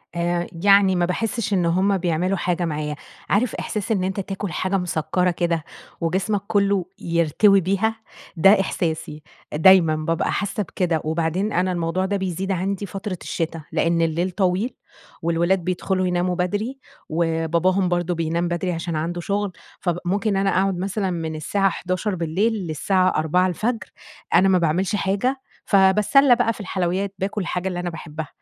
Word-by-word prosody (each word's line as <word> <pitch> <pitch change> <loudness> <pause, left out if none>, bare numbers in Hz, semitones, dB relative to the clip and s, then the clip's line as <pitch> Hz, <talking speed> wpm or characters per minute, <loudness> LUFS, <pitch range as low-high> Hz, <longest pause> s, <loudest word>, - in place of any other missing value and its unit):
آآ، 175 0 0 0.2
يعني 200 -1 +6
ما 175 -1 +2
باحسش 220 +3 -2
إن 180 -3 +2
همّ 190 +4 +2
بيعملوا 180 +2 0
حاجة 175 0 -1
معايا، 150 -2 -3 0.3
عارف 225 +4 +1
إحساس 210 0 -3
إن 195 -4 +1
أنت 190 +1 -2
تاكل 195 0 -4
حاجة 185 +4 0
مسكرة 180 0 0
كده، 170 -2 -1 0.4
وجسمك 190 +5 0
كلّه، 200 -3 +2
يرتوي 170 +4 +3
بيها؟ 200 +5 0 0.4
ده 195 +4 +6
إحساسي، 160 -5 -2 0.3
دايمًا 165 0 +6
بابقى 155 +1 -1
حاسّة 205 +1 -1
بكده، 175 -3 -1
وبعدين 165 +6 -1
أنا 185 +1 +1
الموضوع 175 +1 -1
ده 200 +1 0
بيزيد 190 0 -3
عندي 195 +2 -1
فترة 195 -1 -5
الشتا، 165 -1 -3
لإن 165 0 +1
الليل 165 +3 0
طويل، 190 +5 0 0.5
والولاد 170 +3 +1
بيدخلوا 185 +1 -1
يناموا 180 0 0
بدري، 205 +9 -2 0.3
وباباهم 170 +3 +1
برضو 175 0 0
بينام 165 +1 -1
بدري 175 +1 -1
عشان 165 0 -3
عنده 170 +3 -2
شغل، 200 +2 -1 0.3
فممكن 195 +3 -1
أنا 195 0 +2
أقعد 190 0 +1
مثلًا 195 +2 -2
مِن 160 -2 -3
الساعة 195 +6 +1
23:00 185 +3 -2
بالليل، 180 +7 0
للساعة 185 +4 +2
4:00 170 +4 +2
الفجر، 220 +6 -2 0.4
أنا 195 - +6
ما 185 - +4
باعملش 180 +4 +1
حاجة، 205 +7 0 0.2
فباتسلى 210 +7 +5
بقى 230 - +1
في - - -14
الحلويّات، 190 0 -2
باكل 200 +2 -2
الحاجة 180 +1 -2
اللي 180 -1 -3
أنا 175 0 -2
باحبّها، 160 -2 -7
185 Hz, 155 wpm, -22 LUFS, 170-195 Hz, 0.5 s, يعني